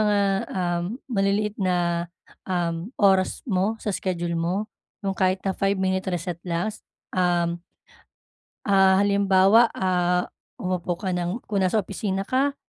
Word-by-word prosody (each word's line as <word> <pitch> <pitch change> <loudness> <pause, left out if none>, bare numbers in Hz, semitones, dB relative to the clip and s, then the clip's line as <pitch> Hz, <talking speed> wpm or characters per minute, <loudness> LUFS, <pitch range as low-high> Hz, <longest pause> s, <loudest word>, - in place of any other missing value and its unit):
mga, 205 -1 +3 0.3
um, 175 -2 -1 0.3
maliliit 200 -1 +1
na, 175 -2 0 0.4
um, 170 0 -1
oras 190 -2 +3
mo 205 -1 0
sa 210 - -2
schedule 175 -3 -2
mo 190 +6 -1 0.4
yung 195 - 0
kahit 185 0 +1
na 195 - +1
five 195 +1 0
minutes 190 0 0
reset 175 -1 -3
lang, 175 +6 -1 0.4
um 175 -1 +1 1.1
ah, 195 -2 +5
halimbawa, 200 +2 +5
ah, 180 -1 +1 0.2
umupo 180 -5 -2
ka 190 +2 -4
ng 180 +5 -2
kung 205 - +1
nasa 210 +3 +1
opisina 195 0 -3
ka, 270 +6 +1
190 Hz, 130 wpm, -24 LUFS, 175-200 Hz, 1.1 s, ah